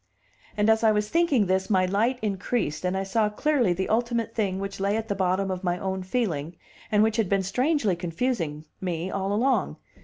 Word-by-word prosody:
And 210 Hz, 0 st, +2 dB
as 220 Hz, +1 st, +4 dB
I 220 Hz, -, +6 dB
was 210 Hz, 0 st, 0 dB
thinking 325 Hz, -10 st, +3 dB
this 190 Hz, +1 st, 0 dB
my 185 Hz, -3 st, +3 dB
light 220 Hz, +7 st, +1 dB
increased, 195 Hz, -5 st, -1 dB
and 180 Hz, +1 st, 0 dB
I 195 Hz, -, -1 dB
saw 210 Hz, +2 st, +1 dB
clearly 255 Hz, -1 st, +1 dB
the 185 Hz, +2 st, -1 dB
ultimate 230 Hz, 0 st, 0 dB
thing 195 Hz, -4 st, -1 dB
which 195 Hz, 0 st, -5 dB
lay 200 Hz, +2 st, +1 dB
at 225 Hz, 0 st, -4 dB
the -, -, +1 dB
bottom 190 Hz, 0 st, 0 dB
of 185 Hz, 0 st, -4 dB
my 175 Hz, -1 st, 0 dB
own 190 Hz, 0 st, -3 dB
feeling, 180 Hz, -, -2 dB, 0.4 s
and 210 Hz, 0 st, +4 dB
which 220 Hz, +1 st, +1 dB
had 220 Hz, -5 st, +1 dB
been 195 Hz, -1 st, +2 dB
strangely 250 Hz, -, +1 dB
confusing 170 Hz, -, -2 dB, 0.2 s
me 180 Hz, -1 st, -3 dB
all 195 Hz, 0 st, -2 dB
along. 250 Hz, +6 st, +1 dB
200 Hz, 205 wpm, -26 LUFS, 185-225 Hz, 0.4 s, I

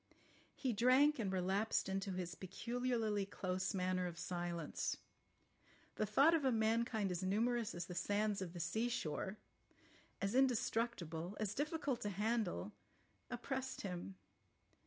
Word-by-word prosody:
He 255 Hz, -4 st, 0 dB
drank 255 Hz, +6 st, +5 dB
and 200 Hz, -4 st, 0 dB
relapsed 190 Hz, +4 st, +1 dB
into 195 Hz, 0 st, -1 dB
his 180 Hz, -2 st, -3 dB
peculiarly 225 Hz, +3 st, -1 dB
close 185 Hz, 0 st, -2 dB
manner 185 Hz, -1 st, +1 dB
of 170 Hz, -1 st, -6 dB
silence. 175 Hz, -2 st, -2 dB, 1.0 s
The 215 Hz, -, 0 dB
thought 275 Hz, +10 st, +6 dB
of 325 Hz, -3 st, +3 dB
a 265 Hz, -, +4 dB
mankind 220 Hz, -2 st, +2 dB
as 175 Hz, 0 st, -2 dB
numerous 225 Hz, +4 st, +1 dB
as 175 Hz, 0 st, -3 dB
the 180 Hz, -, -6 dB
sands 205 Hz, +3 st, +1 dB
of 175 Hz, -2 st, -4 dB
the 175 Hz, -, -6 dB
sea 220 Hz, +8 st, 0 dB
shore, 190 Hz, -1 st, -2 dB, 0.8 s
as 200 Hz, +1 st, 0 dB
indestructible, 225 Hz, -, +1 dB
as 215 Hz, -1 st, 0 dB
difficult 290 Hz, -1 st, -1 dB
to 205 Hz, -, -1 dB
handle, 210 Hz, 0 st, 0 dB, 0.6 s
oppressed 265 Hz, +2 st, -3 dB
him. 185 Hz, 0 st, -5 dB
205 Hz, 135 wpm, -39 LUFS, 185-240 Hz, 1.0 s, thought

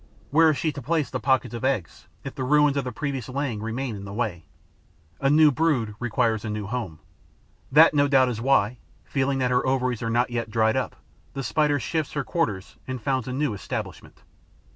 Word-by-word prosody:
Where 160 Hz, +2 st, +6 dB
is 150 Hz, -, +1 dB
she 160 Hz, -, 0 dB
to 140 Hz, -, -8 dB
place 155 Hz, +2 st, -1 dB
the -, -, -2 dB
pockets 130 Hz, -2 st, +1 dB
of 115 Hz, -, -6 dB
eggs, 130 Hz, -10 st, -2 dB, 0.2 s
if 135 Hz, -, -6 dB
the 130 Hz, -, -4 dB
ruins 150 Hz, +1 st, +4 dB
of 140 Hz, -2 st, -1 dB
the 125 Hz, -, -3 dB
previous 135 Hz, 0 st, -4 dB
laying 130 Hz, -5 st, -2 dB
remain 115 Hz, +2 st, -3 dB
in 100 Hz, -, -8 dB
the 100 Hz, -, -8 dB
way? 100 Hz, -9 st, -3 dB, 0.7 s
A 135 Hz, -, +2 dB
new 150 Hz, +1 st, +6 dB
brood 135 Hz, -8 st, +1 dB
requires 115 Hz, -2 st, 0 dB
a 110 Hz, -, -4 dB
new 105 Hz, -1 st, -3 dB
home. 105 Hz, -7 st, -4 dB, 0.7 s
That, 155 Hz, +4 st, +7 dB
no 145 Hz, -1 st, +3 dB
doubt, 135 Hz, -2 st, +4 dB
is 115 Hz, -2 st, -4 dB
why, 125 Hz, -3 st, +2 dB, 0.3 s
feeling 135 Hz, 0 st, 0 dB
that 125 Hz, -1 st, 0 dB
her 125 Hz, -, +2 dB
ovaries 130 Hz, -3 st, 0 dB
are 115 Hz, -, -2 dB
not 120 Hz, +2 st, +1 dB
yet 115 Hz, -2 st, -2 dB
dried 110 Hz, 0 st, +2 dB
up, -, -, -2 dB, 0.4 s
the 135 Hz, -, -3 dB
Spider 145 Hz, +3 st, +1 dB
shifts 155 Hz, +3 st, -2 dB
her 145 Hz, -, -1 dB
quarters 115 Hz, -, -2 dB
and 130 Hz, -1 st, -4 dB
founds 130 Hz, +1 st, -1 dB
a -, -, -3 dB
new 135 Hz, -2 st, -1 dB
establishment. 100 Hz, -, -7 dB
130 Hz, 205 wpm, -25 LUFS, 115-140 Hz, 0.7 s, That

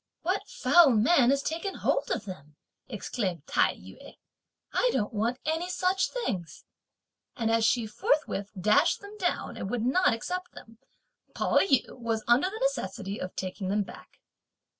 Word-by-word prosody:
"What 370 Hz, +4 st, -1 dB
foul 345 Hz, -4 st, +5 dB
man 245 Hz, +3 st, +4 dB
has 275 Hz, +1 st, +2 dB
taken 335 Hz, +5 st, -3 dB
hold -, -, 0 dB
of -, -, -2 dB
them?" 150 Hz, -6 st, -10 dB, 0.3 s
exclaimed 190 Hz, -, -3 dB
Tai -, -, +2 dB
yü. -, -, -14 dB, 0.6 s
"I -, -, +3 dB
don't 210 Hz, -, -1 dB
want 230 Hz, +4 st, 0 dB
any 325 Hz, +3 st, -1 dB
such 370 Hz, +1 st, +1 dB
things;" 180 Hz, -, -4 dB, 0.7 s
and 225 Hz, -1 st, 0 dB
as 230 Hz, 0 st, +2 dB
she 235 Hz, 0 st, +2 dB
forthwith 210 Hz, -2 st, -1 dB
dashed 210 Hz, +4 st, +3 dB
them 405 Hz, +1 st, -11 dB
down, 355 Hz, -3 st, -2 dB
and 190 Hz, -, -4 dB
would 235 Hz, 0 st, -1 dB
not 365 Hz, +8 st, +3 dB
accept 360 Hz, +11 st, -4 dB
them, 225 Hz, -1 st, -14 dB, 0.6 s
Pao -, -, +2 dB
yü 280 Hz, -9 st, +2 dB
was 225 Hz, -2 st, -2 dB
under 245 Hz, +10 st, +4 dB
the 435 Hz, +3 st, -7 dB
necessity 210 Hz, -, -2 dB
of 185 Hz, -, -6 dB
taking 190 Hz, +1 st, -4 dB
them 205 Hz, +2 st, +1 dB
back. -, -, -14 dB
240 Hz, 160 wpm, -28 LUFS, 210-350 Hz, 0.7 s, foul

